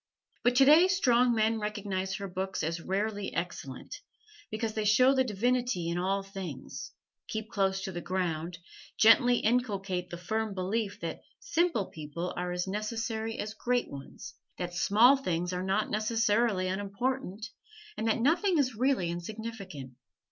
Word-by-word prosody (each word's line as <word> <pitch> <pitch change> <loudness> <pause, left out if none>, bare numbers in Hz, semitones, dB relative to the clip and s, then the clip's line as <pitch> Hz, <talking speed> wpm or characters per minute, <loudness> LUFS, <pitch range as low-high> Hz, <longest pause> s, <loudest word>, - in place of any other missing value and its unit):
But 245 +1 +2
today 300 +7 +7
strong 250 -10 +3
men 220 0 +2
recognize 200 -3 -3
her 200 +1 -5
books 190 -1 -3
as 165 +2 -2
rarely 205 +2 -2
excellent, 140 -7 -5 0.5
because 220 0 -2
they 215 - -1
show 255 +6 +5
the 260 -1 +3
divinity 240 -4 0
in 170 +1 -1
all 195 +2 0
things, 195 -2 -7 0.4
keep 220 0 -4
close 195 -1 0
to 195 - -3
the 175 -1 -5
ground, 175 -2 -2 0.4
gently 240 +2 +6
inculcate 200 -6 0
the 175 - -6
firm 215 +4 -2
belief 200 +3 -2
that 165 -1 -4 0.2
simple 340 - +1
people 160 +3 -5
are 180 0 -2
as 180 0 -1
necessary 220 +2 -3
as 215 +1 -4
great 245 +2 -1
ones, 140 +8 -9 0.2
that 175 -1 -4
small 220 +10 +5
things 180 -7 -2
are 180 - -2
not 195 +3 0
necessarily 215 -2 +1
unimportant, 205 +3 -3 0.4
and 225 - -2
that 225 - +2
nothing 340 - +3
is 260 -4 +2
really 250 -5 +1
insignificant. 195 - -6
210 Hz, 150 wpm, -30 LUFS, 185-230 Hz, 0.5 s, today